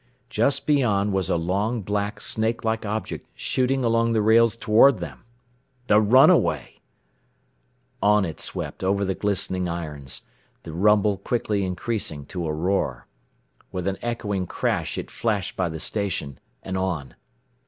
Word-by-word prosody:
Just 140 0 +1
beyond 105 -9 +2
was 95 -3 0
a - - +2
long, 100 +7 -1
black, 105 +1 -2
snake 110 +1 -1
like 110 -1 -1
object, 110 +2 -4
shooting 130 +1 0
along 115 0 +2
the 110 - +2
rails 115 +1 +5
toward 115 +5 +5
them. 80 - -8 0.6
The 105 -3 +5
runaway! 125 +6 +4 1.2
On 105 -1 +4
it 80 - -6
swept - - -4
over 100 +1 +1
the 95 - 0
glistening 95 -3 -1
irons, 75 -6 -5 0.4
the 80 - -8
rumble 105 +2 +3
quickly 105 -1 -1
increasing 90 -6 -3
to 90 -3 -2
a - - -1
roar. 80 -5 -1 0.7
With 90 -1 -4
an 95 0 -2
echoing 105 -6 -2
crash - - -1
it - - -5
flashed 105 -4 -1
by 90 -2 0
the 80 0 -6
station, 95 -9 -3 0.2
and 95 0 -3
on. 85 -9 -2
100 Hz, 145 wpm, -24 LUFS, 90-110 Hz, 1.2 s, rails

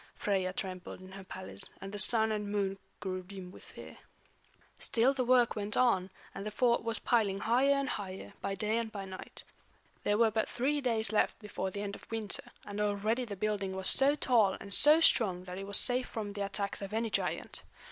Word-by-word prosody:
Freia 190 -3 -1
trembled 185 -1 -6
in 185 0 -13
her 195 0 -9
palace, 95 - -6 0.2
and 195 0 -8
the 205 - -2
Sun 220 +1 +7
and 210 -1 -3
Moon 195 -1 -1 0.2
grew 185 -2 -4
dim 185 -1 -10
with - - -14
fear. - - -12 0.8
Still 245 +4 +2
the 265 -2 -1
work 245 -1 +3
went 210 -1 -3
on, 195 -7 +2 0.2
and 195 - -6
the 210 - -3
fort 235 +3 +1
was 230 -1 -1
piling 205 -5 +1
higher 255 +6 +3
and 275 -1 -1
higher, 190 -5 -6
by 195 0 -3
day 215 +4 0
and 225 -1 -4
by 200 -2 -6
night. 190 -1 -7 0.6
There 205 - +1
were 225 -1 +4
but 220 0 -1
three 285 +4 -1
days 225 -5 +1
left 215 - +1
before 205 -3 -5
the 200 +2 -5
end 200 -1 -5
of - - -15
winter, 220 -3 -5
and 205 +1 -5
already 210 +4 0
the 205 -3 -6
building 200 -1 -2
was 190 0 +1
so 275 +2 +3
tall 230 -9 +2
and 200 - -2
so 300 +8 +7
strong 190 - +3
that 180 0 -7
it 195 - -7
was 200 - +5
safe 250 0 +4
from 210 -3 -5
the 205 - -5
attacks 200 +1 -2
of 200 +1 -6
any 225 0 -1
giant. - - -2
205 Hz, 210 wpm, -31 LUFS, 195-230 Hz, 0.8 s, Sun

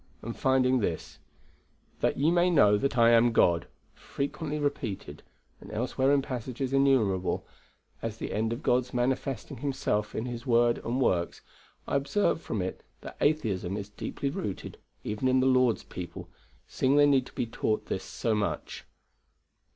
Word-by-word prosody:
and 115 +1 -5
finding 130 -1 +3
this, 85 -7 -3 0.8
'That - - +1
ye 150 +4 +3
may 175 +1 +3
know 140 -12 +5
that 130 +4 -1
I 115 0 +6
am 120 +1 +5
God' 85 -6 +3 0.3
frequently 150 +2 -4
repeated, 145 -8 -3 0.4
and - - -12
elsewhere 130 +4 +1
in 140 -1 +3
passages 130 +1 -4
innumerable, 125 -10 +2 0.6
as 115 -1 -4
the - - -5
end 110 +1 0
of 115 +5 -4
God's 125 0 +1
manifesting 130 -1 -1
Himself 110 -6 -1
in 110 - -2
His 120 -2 -5
word 120 -2 +3
and 120 +3 -2
works; 90 -9 0 0.5
I - - +1
observe 150 +5 +1
from 105 - -3
it 95 - -5 0.2
that - - -9
atheism 105 - 0
is 100 -1 -6
deeply 135 +6 -4
rooted 105 -8 -5 0.2
even 105 +5 -2
in 130 0 +4
the 130 - +2
Lord's 130 -3 +3
people, 85 -2 -8 0.4
seeing 135 +2 +1
they 145 0 +6
need 135 -3 +3
to - - -15
be - - -1
taught 110 -1 -1
this 95 - -3
so 115 - -2
much. 105 -1 -3
125 Hz, 160 wpm, -28 LUFS, 110-135 Hz, 0.8 s, I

